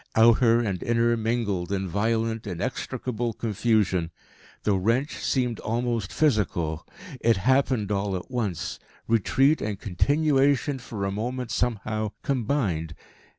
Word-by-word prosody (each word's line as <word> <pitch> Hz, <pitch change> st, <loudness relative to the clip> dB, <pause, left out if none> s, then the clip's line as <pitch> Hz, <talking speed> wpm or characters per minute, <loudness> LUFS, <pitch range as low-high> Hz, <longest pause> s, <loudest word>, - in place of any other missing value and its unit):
Outer 115 Hz, +1 st, +5 dB
and 100 Hz, -6 st, -2 dB
inner 120 Hz, 0 st, +2 dB
mingled 110 Hz, -6 st, -1 dB
in 95 Hz, -1 st, -1 dB
violent, 110 Hz, +3 st, -1 dB
inextricable 120 Hz, +4 st, -3 dB
confusion. 105 Hz, -6 st, +1 dB, 0.5 s
The 105 Hz, -, +2 dB
wrench 115 Hz, +9 st, +1 dB
seemed 125 Hz, -4 st, 0 dB
almost 115 Hz, -2 st, -2 dB
physical. 90 Hz, -, 0 dB, 0.3 s
It 115 Hz, -2 st, +3 dB
happened 125 Hz, -1 st, +2 dB
all 100 Hz, -1 st, 0 dB
at 90 Hz, +8 st, -6 dB
once, 105 Hz, -, -2 dB, 0.3 s
retreat 135 Hz, +7 st, +3 dB
and 105 Hz, -2 st, -3 dB
continuation 140 Hz, -, +2 dB
for 110 Hz, -5 st, -5 dB
a 95 Hz, -, -1 dB
moment 125 Hz, +4 st, -3 dB
somehow 110 Hz, -2 st, -1 dB
combined. 110 Hz, -, -1 dB
115 Hz, 115 wpm, -26 LUFS, 100-125 Hz, 0.5 s, Outer